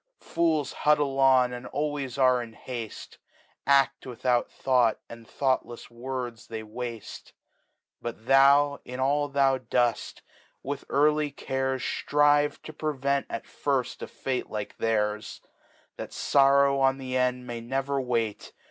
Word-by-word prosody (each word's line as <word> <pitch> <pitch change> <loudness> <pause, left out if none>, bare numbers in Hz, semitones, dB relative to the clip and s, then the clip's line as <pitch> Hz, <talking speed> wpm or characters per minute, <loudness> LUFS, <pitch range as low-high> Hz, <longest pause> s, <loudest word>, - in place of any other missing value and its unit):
Fools 160 -4 0
huddfeon 135 -4 +3
and 120 - -8
always 145 -3 -3
are 130 -2 +4
in 115 -2 -9
hafle, 120 -4 -7 0.5
Adt 140 0 +3
without 125 0 0
Thought, 125 -4 +2
and 115 -1 -12
thoughtlefs 130 -4 -2
Words 120 -1 -6
they 110 -1 -6
wafte 115 0 -7 0.7
But 115 -1 -7
thou, 140 +2 +5
in 125 +1 -8
all 145 +2 +1
thou 135 -1 +2
dpft, 120 -1 -1 0.4
with 140 +1 -5
early 150 +1 +2
Cares 130 -2 -2
Strive 145 0 +2
to 155 - -9
prevent 140 -2 -1
at - - -4
firft 135 -3 -2
a - - -5
Fate 130 -2 -4
like 105 -1 -5
theirs; 105 -1 -1 0.6
That - - -7
Sorrow 140 0 +4
on 135 0 +3
the 130 -1 -5
End 125 -1 0
ma^ 120 -1 -6
never 135 +3 -1
wait. 115 -4 -2
130 Hz, 130 wpm, -27 LUFS, 120-140 Hz, 0.7 s, thou